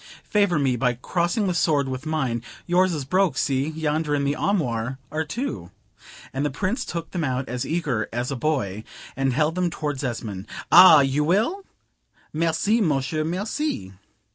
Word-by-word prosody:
Favor 200 Hz, -5 st, +2 dB
me 135 Hz, -4 st, +1 dB
by 125 Hz, 0 st, +1 dB
crossing 175 Hz, -, -1 dB
the 185 Hz, -, 0 dB
sword 150 Hz, -5 st, +2 dB
with 130 Hz, +3 st, -5 dB
mine: 135 Hz, -7 st, -1 dB, 0.2 s
yours 185 Hz, +1 st, +3 dB
is 150 Hz, -5 st, -3 dB
broke 185 Hz, +4 st, +1 dB
see, 135 Hz, 0 st, +1 dB
yonder 155 Hz, -1 st, -1 dB
in 140 Hz, -, 0 dB
the 140 Hz, +1 st, 0 dB
armoire 130 Hz, -, -1 dB
are 155 Hz, +1 st, -1 dB
two;" 155 Hz, -, -4 dB, 0.6 s
and 135 Hz, +2 st, -1 dB
the 150 Hz, -, +1 dB
Prince 195 Hz, -, -2 dB
took 170 Hz, -1 st, -5 dB
them 175 Hz, -3 st, -2 dB
out 130 Hz, -1 st, -1 dB
as 125 Hz, 0 st, -3 dB
eager 145 Hz, -10 st, -1 dB
as 120 Hz, +3 st, -2 dB
a -, -, -2 dB
boy, 120 Hz, -8 st, -1 dB, 0.3 s
and 135 Hz, 0 st, +1 dB
held 155 Hz, +4 st, +1 dB
them 180 Hz, 0 st, 0 dB
towards 150 Hz, -4 st, -4 dB
Esmond: 110 Hz, -6 st, -4 dB, 0.2 s
"Ah! 175 Hz, -4 st, +9 dB
you 135 Hz, +2 st, +1 dB
will? 215 Hz, -, +1 dB, 0.7 s
Merci, 170 Hz, +8 st, +1 dB
monsieur, 155 Hz, -2 st, 0 dB
merci!" 185 Hz, -, -3 dB
150 Hz, 165 wpm, -24 LUFS, 130-175 Hz, 0.7 s, Ah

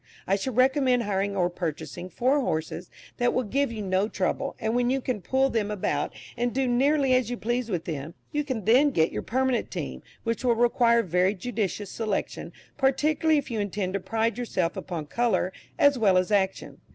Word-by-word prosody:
I 195 Hz, -, +2 dB
should 230 Hz, +4 st, -3 dB
recommend 255 Hz, -1 st, +3 dB
hiring 200 Hz, -1 st, -1 dB
or 175 Hz, -2 st, +3 dB
purchasing 175 Hz, 0 st, -5 dB
four 260 Hz, +8 st, +2 dB
horses 165 Hz, -, -3 dB, 0.3 s
that 245 Hz, 0 st, +1 dB
will 255 Hz, -, +2 dB
give 275 Hz, +4 st, 0 dB
you 220 Hz, -2 st, -5 dB
no 190 Hz, +1 st, +1 dB
trouble, 270 Hz, +9 st, -2 dB
and 220 Hz, +1 st, -1 dB
when 245 Hz, 0 st, +2 dB
you 270 Hz, +1 st, +1 dB
can 250 Hz, -5 st, -3 dB
pull 265 Hz, +6 st, +1 dB
them 215 Hz, -3 st, 0 dB
about, 210 Hz, -3 st, -1 dB, 0.2 s
and 240 Hz, 0 st, 0 dB
do 265 Hz, +1 st, 0 dB
nearly 270 Hz, +2 st, +3 dB
as 255 Hz, -3 st, +2 dB
you 245 Hz, -, -3 dB
please 240 Hz, +1 st, -2 dB
with 175 Hz, -4 st, -2 dB
them, 155 Hz, +1 st, -5 dB, 0.2 s
you 295 Hz, -1 st, 0 dB
can 255 Hz, -9 st, -4 dB
then 260 Hz, +6 st, +5 dB
get 160 Hz, -, +2 dB
your -, -, -3 dB
permanent 260 Hz, -1 st, 0 dB
team, 65 Hz, -1 st, -5 dB, 0.2 s
which 230 Hz, +2 st, -2 dB
will 240 Hz, -2 st, +3 dB
require 235 Hz, 0 st, +4 dB
a -, -, -6 dB
very 180 Hz, +2 st, +2 dB
judicious 205 Hz, -1 st, -3 dB
selection, 215 Hz, -3 st, -3 dB, 0.3 s
particularly 300 Hz, +4 st, +2 dB
if 280 Hz, -3 st, -3 dB
you 225 Hz, -, -1 dB
intend 200 Hz, -2 st, -2 dB
to 200 Hz, -, 0 dB
pride 225 Hz, +3 st, -1 dB
yourself 185 Hz, -8 st, -1 dB
upon 170 Hz, -4 st, -5 dB
colour 225 Hz, 0 st, 0 dB, 0.2 s
as 285 Hz, -3 st, +4 dB
well 195 Hz, -4 st, +4 dB
as 185 Hz, +3 st, +1 dB
action. 195 Hz, -2 st, 0 dB
225 Hz, 200 wpm, -26 LUFS, 190-255 Hz, 0.3 s, then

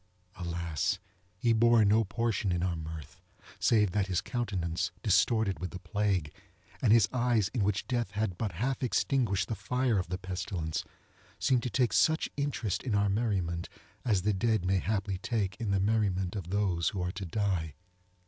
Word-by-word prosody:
Alas! 85 Hz, -3 st, -2 dB, 0.4 s
he 115 Hz, +4 st, +2 dB
bore 115 Hz, -1 st, +5 dB
no 110 Hz, +3 st, +4 dB
portion 110 Hz, -1 st, -1 dB
in 90 Hz, 0 st, 0 dB
our 90 Hz, -2 st, 0 dB
mirth, 80 Hz, -2 st, -8 dB, 0.4 s
save 105 Hz, -5 st, +3 dB
that 100 Hz, 0 st, 0 dB
his 95 Hz, -3 st, +1 dB
countenance, 90 Hz, -10 st, -2 dB
distorted 105 Hz, +1 st, +2 dB
with 90 Hz, -, -3 dB
the -, -, -7 dB
plague, 95 Hz, -4 st, -1 dB, 0.5 s
and 115 Hz, -, +4 dB
his 110 Hz, -3 st, +6 dB
eyes, 120 Hz, -5 st, +2 dB
in 115 Hz, -3 st, -1 dB
which 105 Hz, 0 st, 0 dB
Death 120 Hz, -5 st, -1 dB
had 105 Hz, -3 st, -1 dB
but 100 Hz, +1 st, -3 dB
half 125 Hz, +9 st, -1 dB
extinguished 120 Hz, -7 st, +1 dB
the -, -, -2 dB
fire 115 Hz, +3 st, 0 dB
of 90 Hz, -, -3 dB
the 90 Hz, +1 st, -3 dB
pestilence, 90 Hz, -3 st, -3 dB, 0.5 s
seemed 130 Hz, -2 st, +2 dB
to 125 Hz, -, -2 dB
take 120 Hz, +2 st, +1 dB
such 160 Hz, 0 st, +3 dB
interest 140 Hz, -8 st, -1 dB
in 120 Hz, -5 st, -1 dB
our 100 Hz, 0 st, +3 dB
merriment 95 Hz, -6 st, -1 dB, 0.3 s
as 100 Hz, -7 st, +1 dB
the 105 Hz, +1 st, +2 dB
dead 110 Hz, -1 st, +1 dB
may 95 Hz, +1 st, +2 dB
haply 100 Hz, -2 st, -1 dB
take 100 Hz, -3 st, -1 dB
in 115 Hz, -, -3 dB
the 100 Hz, -1 st, +2 dB
merriment 95 Hz, -2 st, +1 dB
of 90 Hz, -4 st, -5 dB
those 95 Hz, -5 st, +1 dB
who 95 Hz, -, -4 dB
are 90 Hz, -, -1 dB
to 95 Hz, +1 st, -6 dB
die. 90 Hz, -5 st, -1 dB
100 Hz, 175 wpm, -30 LUFS, 90-115 Hz, 0.5 s, his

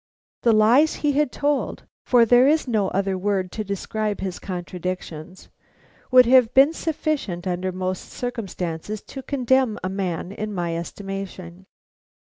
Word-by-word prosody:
The 235 Hz, -, +4 dB
lies 230 Hz, +8 st, +4 dB
he 295 Hz, -, +4 dB
had 290 Hz, -1 st, +1 dB
told 290 Hz, 0 st, -1 dB, 0.2 s
for 240 Hz, -2 st, +5 dB
there 245 Hz, +3 st, +5 dB
is 310 Hz, -1 st, +2 dB
no 215 Hz, -5 st, +1 dB
other 195 Hz, -1 st, -1 dB
word 190 Hz, -2 st, -1 dB
to 215 Hz, -, -4 dB
describe 210 Hz, +1 st, -3 dB
his 190 Hz, -2 st, -4 dB
contradictions 180 Hz, -2 st, -6 dB, 0.6 s
would 255 Hz, -1 st, +7 dB
have 245 Hz, -1 st, +5 dB
been 275 Hz, +4 st, +6 dB
sufficient 300 Hz, -, -2 dB
under 185 Hz, 0 st, -2 dB
most 185 Hz, 0 st, -4 dB
circumstances 205 Hz, -5 st, -5 dB
to 270 Hz, -, -8 dB
condemn 260 Hz, -3 st, +1 dB
a 185 Hz, -, -1 dB
man 185 Hz, -2 st, -3 dB
in 210 Hz, 0 st, -5 dB
my 170 Hz, -2 st, -2 dB
estimation. 190 Hz, 0 st, -7 dB
200 Hz, 140 wpm, -23 LUFS, 185-250 Hz, 0.6 s, would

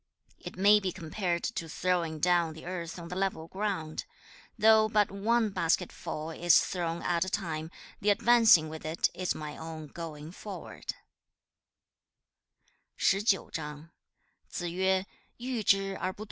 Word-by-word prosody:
It -, -, -9 dB
may 205 Hz, +2 st, +6 dB
be 190 Hz, -2 st, -2 dB
compared 175 Hz, 0 st, -2 dB
to 165 Hz, -8 st, -3 dB
throwing 170 Hz, -1 st, 0 dB
down 170 Hz, 0 st, +2 dB
the 160 Hz, -, -11 dB
earth 175 Hz, -1 st, -5 dB
on 170 Hz, -1 st, -8 dB
the 180 Hz, -, -5 dB
level 190 Hz, -4 st, -1 dB
ground. 190 Hz, -5 st, -3 dB, 0.5 s
Though 220 Hz, 0 st, +6 dB
but 210 Hz, -3 st, +2 dB
one 220 Hz, +2 st, +1 dB
basketful 165 Hz, -2 st, -1 dB
is 175 Hz, +1 st, +5 dB
thrown 170 Hz, -2 st, -2 dB
at 170 Hz, -1 st, +1 dB
a 190 Hz, -, -3 dB
time, 160 Hz, -5 st, -3 dB, 0.3 s
the 205 Hz, -, +1 dB
advancing 225 Hz, -6 st, +6 dB
with 155 Hz, 0 st, -8 dB
it 155 Hz, +2 st, 0 dB
is 185 Hz, 0 st, -2 dB
my 150 Hz, -1 st, -6 dB
own 160 Hz, -1 st, -7 dB
going 155 Hz, 0 st, -8 dB
forward.' 200 Hz, +1 st, -7 dB
175 Hz, 115 wpm, -30 LUFS, 160-200 Hz, 0.5 s, may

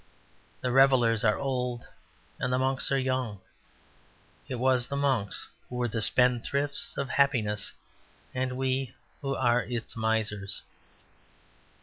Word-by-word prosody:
The 125 Hz, -, -1 dB
revellers 125 Hz, -4 st, +4 dB
are 105 Hz, -2 st, +3 dB
old, 125 Hz, -3 st, -2 dB, 0.5 s
and 125 Hz, -, -1 dB
the 125 Hz, -, +2 dB
monks 130 Hz, +1 st, +1 dB
are 135 Hz, -, +3 dB
young. 130 Hz, -6 st, -1 dB, 1.1 s
It 130 Hz, -, -3 dB
was 125 Hz, 0 st, +2 dB
the 140 Hz, -, -4 dB
monks 135 Hz, -8 st, 0 dB, 0.2 s
who 125 Hz, -, -7 dB
were 125 Hz, 0 st, 0 dB
the 115 Hz, 0 st, -2 dB
spendthrifts 125 Hz, +5 st, +2 dB
of 140 Hz, -, -1 dB
happiness, 115 Hz, -8 st, +1 dB, 0.6 s
and 130 Hz, 0 st, -2 dB
we 130 Hz, -1 st, -1 dB, 0.3 s
who 135 Hz, -1 st, -2 dB
are 120 Hz, +1 st, +3 dB
its 120 Hz, -1 st, -5 dB
misers. 110 Hz, -3 st, -1 dB
125 Hz, 125 wpm, -28 LUFS, 115-135 Hz, 1.1 s, revellers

